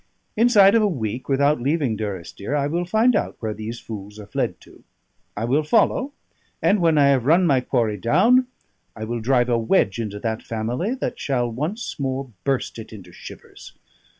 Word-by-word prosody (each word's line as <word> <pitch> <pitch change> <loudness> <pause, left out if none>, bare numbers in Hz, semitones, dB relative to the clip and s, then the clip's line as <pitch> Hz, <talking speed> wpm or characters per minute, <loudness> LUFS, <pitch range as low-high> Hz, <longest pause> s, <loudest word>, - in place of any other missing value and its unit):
Inside 210 -4 +5
of 230 - +4
a 210 - +3
week, 125 - -4
without 140 0 +2
leaving 140 -3 0
Durrisdeer, 100 - -5
I 140 -1 +1
will 170 +5 -1
find 220 +7 +3
out - - -1
where 110 -2 -3
these 110 +3 -6
fools 105 -1 -9
are 105 - -9
fled 100 - -3
to. - - -18 0.5
I 110 - -1
will 135 +6 +2
follow; 235 - +1 0.5
and 205 - +2
when 165 -2 +3
I 140 -1 +5
have 130 -2 +2
run 175 +4 +5
my 135 -6 +3
quarry 115 -5 0
down, 245 - +3 0.5
I 110 - -7
will 120 +2 -3
drive 120 +1 +2
a 120 -1 +2
wedge 115 - +1
into 105 -3 -4
that 110 -1 -2
family 120 - -3
that 260 - -4
shall 120 -4 -1
once 155 - -4
more 135 -1 -3
burst 135 -3 -2
it 110 - -10
into 95 -5 -12
shivers. - - -12
130 Hz, 185 wpm, -22 LUFS, 110-170 Hz, 0.5 s, Inside